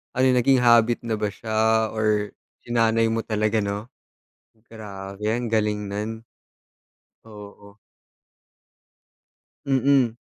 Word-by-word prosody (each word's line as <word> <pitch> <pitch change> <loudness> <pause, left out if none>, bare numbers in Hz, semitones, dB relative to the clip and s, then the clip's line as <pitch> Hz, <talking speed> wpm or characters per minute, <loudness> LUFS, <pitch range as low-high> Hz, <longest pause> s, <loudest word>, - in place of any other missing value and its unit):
ano 130 - +1
'yon 130 - +4
naging 135 +1 +3
habit 120 0 +4
na 115 - -2
ba 105 - 0
siya 110 +1 0
or 105 -1 0 0.3
sinanay 115 -1 +2
mo 115 0 -1
talaga, 110 0 0
'no? 100 +2 -4 0.9
Grabe 100 -2 -9
ang 120 -1 -3
galing 105 -2 0
no'n. 110 +3 -5 1.0
Oo. 105 -1 -13 1.9
Mm. 135 -3 +2
110 Hz, 105 wpm, -23 LUFS, 105-115 Hz, 1.9 s, yon